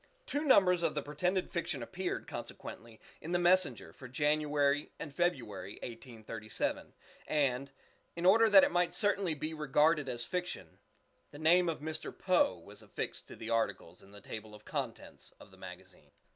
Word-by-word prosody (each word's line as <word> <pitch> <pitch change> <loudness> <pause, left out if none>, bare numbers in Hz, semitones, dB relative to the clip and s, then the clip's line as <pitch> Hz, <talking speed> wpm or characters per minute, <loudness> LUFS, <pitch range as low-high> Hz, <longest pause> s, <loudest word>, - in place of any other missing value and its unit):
Two 290 - -2
numbers 185 - +5
of 170 - 0
the 150 - -1
pretended 180 +6 -1
fiction 150 -7 -2
appeared, 180 +9 -4
consequently, 115 -1 -8 0.2
in 165 +3 -5
the - - +4
"Messenger" 180 +1 +2
for 130 - -11
January 145 +1 +1
and 145 - -7
February 120 - -1
(1837), 115 -2 -5 0.3
and, 140 -3 +1 0.5
in 170 +1 -3
order 225 +4 +7
that 195 -2 +9
it - - +3
might 175 0 +1
certainly 200 -5 +1
be 155 +2 -4
regarded 150 0 +2
as 120 0 -3
fiction, 180 0 -5 0.5
the 145 - -12
name 170 +3 +4
of 155 -3 -3
Mr. 155 +1 -4
Poe - - +3
was - - -12
affixed - - -5
to - - -10
the 115 +1 -6
articles 105 -6 -1
in 95 - -17
the 100 0 -13
table 110 +1 -8
of 105 - -16
contents - - -6
of - - -15
the - - -16
magazine. - - -12
150 Hz, 165 wpm, -33 LUFS, 120-175 Hz, 0.5 s, that